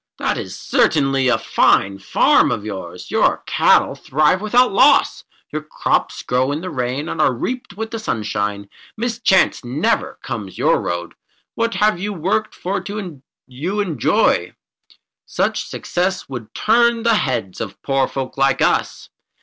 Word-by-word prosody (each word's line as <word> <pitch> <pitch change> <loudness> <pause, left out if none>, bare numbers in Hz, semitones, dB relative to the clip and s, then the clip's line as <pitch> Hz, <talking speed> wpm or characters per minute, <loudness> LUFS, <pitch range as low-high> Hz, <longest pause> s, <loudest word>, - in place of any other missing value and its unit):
That - - -1
is - - -6
certainly 135 -3 +2
a 125 - +3
fine 95 0 +2
farm 95 -1 +3
of 105 - -3
yours. 90 -4 -7
Your - - +2
cattle - - +3
thrive 155 +6 +1
without 245 +3 +3
loss. 265 +8 +4 0.3
Your 155 - -2
crops 155 - -1
grow 130 +2 0
in 150 +2 -3
the 185 0 -5
rain 130 +3 -3
and 160 - -2
are 150 - +4
reaped 245 - -5
with 225 +1 -4
the 225 - -4
sunshine. 105 - -3 0.3
Mischance 225 - +1
never 125 +5 -1
comes 105 -5 -6
your - - +2
road. 85 0 -4 0.4
What 230 0 -1 0.2
you 205 +2 -3
have 180 - -9
worked 210 +6 -1
for 190 +3 -3 0.6
you 160 +11 -4
enjoy. 165 - +1 0.7
Such - - -1
success 185 +1 -2
would 120 -5 -8
turn 235 +1 +3
the 235 - +3
heads 115 -9 -1
of 100 -3 -6
poor 135 -1 +1
folk 135 0 -5
like 135 0 +3
us. - - 0
145 Hz, 150 wpm, -19 LUFS, -, 0.7 s, loss